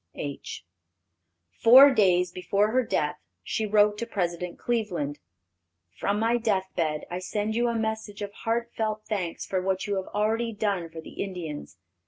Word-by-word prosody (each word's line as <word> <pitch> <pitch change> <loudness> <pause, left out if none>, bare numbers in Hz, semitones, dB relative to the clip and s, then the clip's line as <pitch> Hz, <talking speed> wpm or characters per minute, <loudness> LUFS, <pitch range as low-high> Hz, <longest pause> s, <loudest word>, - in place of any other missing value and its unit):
H." 140 - -6 0.9
Four 265 +4 +9
days 180 -5 +3
before 200 +4 +1
her 255 +2 +3
death 150 -9 -1 0.3
she 220 - -2
wrote 210 0 +4
to 235 - -3
President 180 -4 -2
Cleveland: 185 -12 -2 0.8
"From 200 - 0
my 230 +2 +2
death 195 -5 0
bed 155 -3 -1
I 180 - -2
send 210 +3 -2
you 240 +1 +2
a 235 - 0
message 220 -2 -3
of 200 0 -6
heart 235 +2 -2
felt 215 -1 -2
thanks 185 -6 -3
for 185 -1 -1
what 190 0 -1
you 205 -2 -1
have 190 - -3
already 225 +2 0
done 200 -5 -1
for 160 0 -8
the - - -8
Indians. 160 - -6
205 Hz, 165 wpm, -27 LUFS, 180-220 Hz, 0.9 s, Four